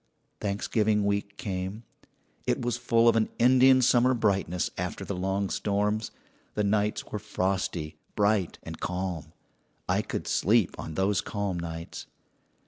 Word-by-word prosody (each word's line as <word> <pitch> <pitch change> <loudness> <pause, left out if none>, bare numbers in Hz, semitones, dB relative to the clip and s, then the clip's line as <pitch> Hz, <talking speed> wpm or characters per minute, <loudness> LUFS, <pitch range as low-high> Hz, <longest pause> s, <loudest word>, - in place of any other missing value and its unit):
"Thanksgiving 105 +1 +1
week 100 0 -1
came. 95 +3 -4 0.6
"It - - +2
was 120 -1 -1
full 120 -1 +3
of 115 - +6
an 110 -1 +2
Indian 130 +1 +6
summer 125 +1 +4
brightness 100 -6 0
after 90 +2 -4
the 100 - -3
long 95 +2 -1
storms. 105 +2 0 0.5
The 105 - +1
nights 105 +1 +1
were 105 - -2
frosty, 95 -6 -2 0.2
bright, 100 -3 +2
and - - -8
calm. 90 -4 -3 0.6
"I - - +2
could - - -4
sleep 110 0 +2
on 80 - -6
those 95 +2 +2
calm 100 -4 -3
nights. 85 0 -6
100 Hz, 135 wpm, -28 LUFS, 95-110 Hz, 0.6 s, of